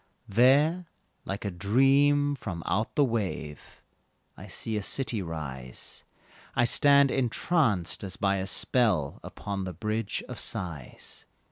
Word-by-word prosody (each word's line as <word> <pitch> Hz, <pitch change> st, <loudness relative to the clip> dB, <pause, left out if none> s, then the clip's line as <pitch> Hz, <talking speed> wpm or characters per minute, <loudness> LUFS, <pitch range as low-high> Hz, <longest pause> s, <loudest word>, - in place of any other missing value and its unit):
There, 145 Hz, -, +4 dB, 0.4 s
like 100 Hz, +2 st, -4 dB
a 100 Hz, -, -1 dB
dream 135 Hz, +9 st, +3 dB
from 90 Hz, -10 st, -6 dB
out 110 Hz, +5 st, -1 dB
the 150 Hz, -, +5 dB
wave, 100 Hz, -, -4 dB, 0.5 s
I -, -, -11 dB
see 110 Hz, -, -3 dB
a 105 Hz, -, -1 dB
city 115 Hz, 0 st, -2 dB
rise, 70 Hz, -7 st, -5 dB, 0.5 s
I 120 Hz, -, +4 dB
stand 140 Hz, +2 st, +5 dB
entranced, 120 Hz, -, +1 dB
as 95 Hz, -2 st, -5 dB
by 100 Hz, -1 st, +1 dB
a 95 Hz, 0 st, -3 dB
spell, 95 Hz, -, +1 dB
Upon 100 Hz, -1 st, -5 dB
the 90 Hz, -1 st, -5 dB
Bridge 110 Hz, +4 st, -2 dB
of -, -, -7 dB
Sighs. 85 Hz, -9 st, -5 dB
105 Hz, 130 wpm, -28 LUFS, 90-135 Hz, 0.5 s, the